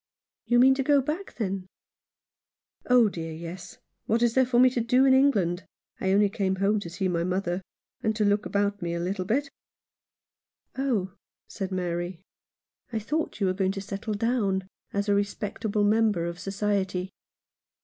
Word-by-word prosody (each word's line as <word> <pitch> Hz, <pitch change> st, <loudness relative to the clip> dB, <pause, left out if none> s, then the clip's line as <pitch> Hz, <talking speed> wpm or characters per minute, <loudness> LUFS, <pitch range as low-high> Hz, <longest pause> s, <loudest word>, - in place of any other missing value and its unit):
" -, -, -67 dB
You 240 Hz, -, +4 dB
mean 260 Hz, +2 st, +7 dB
to 270 Hz, -, -1 dB
go 285 Hz, +1 st, +4 dB
back, 305 Hz, +9 st, -4 dB
then? 195 Hz, -4 st, -3 dB, 0.6 s
" -, -, -27 dB
"Oh 245 Hz, -2 st, +6 dB
dear, 165 Hz, -5 st, -5 dB
yes. 170 Hz, +3 st, -8 dB, 0.3 s
What 230 Hz, +2 st, +2 dB
is 235 Hz, -1 st, +3 dB
there 260 Hz, 0 st, +3 dB
for 245 Hz, -1 st, +3 dB
me 255 Hz, 0 st, +6 dB
to 245 Hz, -, 0 dB
do 250 Hz, +3 st, +3 dB
in 265 Hz, -, +6 dB
England? 195 Hz, -10 st, +2 dB, 0.3 s
I 190 Hz, -, 0 dB
only 205 Hz, +1 st, +5 dB
came 195 Hz, -1 st, -1 dB
home 200 Hz, +2 st, +2 dB
to 175 Hz, -, -7 dB
see 185 Hz, +3 st, -2 dB
my 170 Hz, -2 st, 0 dB
mother, 180 Hz, 0 st, -1 dB, 0.4 s
and 220 Hz, 0 st, 0 dB
to 215 Hz, -1 st, +1 dB
look 205 Hz, +1 st, +2 dB
about 205 Hz, 0 st, 0 dB
me 170 Hz, 0 st, -2 dB
a -, -, -2 dB
little 185 Hz, +2 st, -2 dB
bit." 275 Hz, +8 st, 0 dB, 1.2 s
"Oh," 235 Hz, -9 st, 0 dB, 0.4 s
said 195 Hz, -3 st, -5 dB
Mary, 175 Hz, -1 st, -3 dB, 0.7 s
"I 225 Hz, -, -1 dB
thought 295 Hz, +8 st, -2 dB
you 200 Hz, -, +1 dB
were 185 Hz, -, +2 dB
going 190 Hz, 0 st, 0 dB
to 195 Hz, -, -5 dB
settle 200 Hz, +2 st, -4 dB
down 205 Hz, -4 st, 0 dB, 0.2 s
as 200 Hz, +1 st, -1 dB
a 205 Hz, -, +3 dB
respectable 205 Hz, +1 st, -1 dB
member 210 Hz, -4 st, +2 dB
of 170 Hz, 0 st, -5 dB
society." 195 Hz, -1 st, -1 dB
200 Hz, 180 wpm, -27 LUFS, 185-235 Hz, 1.2 s, mean